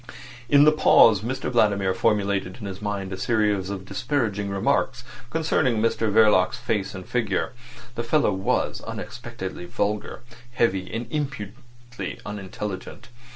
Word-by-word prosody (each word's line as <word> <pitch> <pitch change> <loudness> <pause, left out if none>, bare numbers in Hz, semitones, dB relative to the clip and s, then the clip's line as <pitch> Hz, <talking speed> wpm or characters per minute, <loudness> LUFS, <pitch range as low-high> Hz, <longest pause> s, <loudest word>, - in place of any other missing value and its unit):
In 145 0 +7
the 150 - +7
pause 115 -9 +6
Mr 125 +4 -3
Vladimir 100 -5 +2
formulated 100 -2 0
in 105 - -7
his 95 0 -6
mind 100 -2 -3
a - - -4
series 105 -3 +1
of 95 -2 -5
disparaging 105 -5 -1
remarks 125 +5 0 0.3
concerning 155 -6 +1
Mr 110 0 +1
Verloc's 105 -4 +4
face 100 -2 -2
and 95 -1 -8
figure. 110 -6 -1 0.4
The 120 - -3
fellow 120 -2 +2
was 95 0 -1
unexpectedly 95 -2 -7
vulgar, 105 +4 -2 0.3
heavy, 95 -6 0
and 115 +2 -3
impudently 120 -5 -6
unintelligent. 105 +2 -6
105 Hz, 130 wpm, -24 LUFS, 95-120 Hz, 0.4 s, In